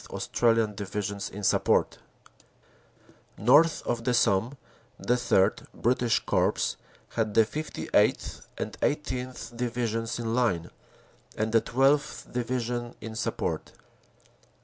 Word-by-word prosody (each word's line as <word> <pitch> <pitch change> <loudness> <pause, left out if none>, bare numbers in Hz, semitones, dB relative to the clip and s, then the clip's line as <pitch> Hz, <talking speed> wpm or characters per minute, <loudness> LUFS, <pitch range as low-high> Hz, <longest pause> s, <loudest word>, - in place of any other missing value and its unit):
Australian 115 -2 +1
Divisions 100 0 -4
in 105 +1 -8
support. - - +2 1.4
North 145 +9 +5
of 120 -1 -1
the 125 0 +1
Somme 115 +4 +2 0.4
the 120 - 0
III 105 -5 +2
(British) 120 -1 +2
Corps - - +1 0.3
had 110 -2 -2
the 115 - +6
58th. 155 +7 -1
and - - -5
18th. 125 -5 -2
Divi 120 0 -1
sions 115 0 -2
in 115 -1 -2
line 100 -9 0 0.7
and 110 +1 0
the 115 0 +4
12th. 140 +3 +1
Division 120 0 -2
in 110 0 -7
support. 115 - -3
115 Hz, 110 wpm, -27 LUFS, 110-125 Hz, 1.4 s, the